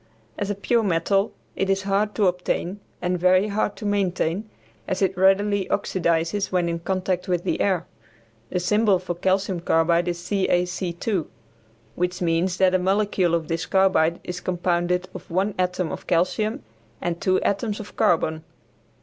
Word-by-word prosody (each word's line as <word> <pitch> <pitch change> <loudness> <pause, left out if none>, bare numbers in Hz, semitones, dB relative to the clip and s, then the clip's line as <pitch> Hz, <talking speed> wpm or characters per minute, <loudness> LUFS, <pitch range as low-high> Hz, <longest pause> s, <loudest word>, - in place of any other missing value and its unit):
As 205 - -3
a 205 - -1
pure 230 +4 +1
metal 195 +1 +1 0.2
it 195 - -1
is 195 0 +1
hard 200 +2 0
to 210 - +2
obtain 180 +1 -1 0.2
and 180 0 0
very 185 +3 +4
hard 205 0 -1
to 215 - -8
maintain, 195 0 0 0.4
as 185 +1 -1
it 190 0 +1
readily 195 +1 +3
oxidizes 170 0 0
when 180 -2 +1
in 170 0 -2
contact 185 +1 -2
with 175 -2 0
the - - -1
air. 185 -4 +1 0.6
The 180 - -1
symbol 210 +2 +3
for 180 -1 -4
calcium 190 +1 0
carbide 170 +1 +2
is 175 -1 -1
CaC_, 180 0 -1 0.7
which 180 +1 -2
means 175 +1 +1
that 185 -1 +4
a 185 - +3
molecule 190 -2 +1
of 165 -2 -2
this 165 0 -2
carbide 185 -4 +3
is 180 0 -5
compounded 180 0 0
of 185 -1 -10
one 190 +4 0
atom 180 -2 0
of - - -7
calcium 185 +6 0 0.4
and 170 -1 -3
two 185 0 +2
atoms 205 +1 -1
of 210 - -9
carbon. 160 -1 +1
185 Hz, 160 wpm, -24 LUFS, 175-195 Hz, 0.7 s, very